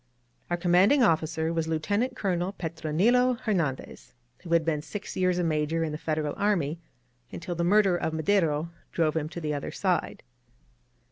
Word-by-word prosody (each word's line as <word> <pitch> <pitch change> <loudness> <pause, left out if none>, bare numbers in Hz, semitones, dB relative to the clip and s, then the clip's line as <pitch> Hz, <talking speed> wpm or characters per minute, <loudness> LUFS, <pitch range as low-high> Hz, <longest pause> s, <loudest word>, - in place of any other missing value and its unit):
Our 175 - 0
commanding 185 +10 +4
officer 160 -3 +1
was 165 -1 -1
Lieutenant 205 +11 -1
Colonel 185 -3 -1
Petronilo 190 +10 +1
Hernandez, 165 - -3 0.2
who 170 - -10
had 165 -2 +3
been 155 -3 0
six 200 +7 -7
years 185 -1 +1
a 180 - +1
Major 160 0 0
in 160 - -2
the 150 - -4
Federal 155 -2 -2
army 170 -7 0 0.5
until 175 +1 -5
the 170 0 -2
murder 195 0 +4
of 160 - -2
Madero 160 -2 +1 0.2
drove 160 -2 +1
him 155 -1 -1
to 170 - -7
the 155 -2 -2
other 145 - -4
side. 185 -3 -1
170 Hz, 160 wpm, -27 LUFS, 155-190 Hz, 0.5 s, commanding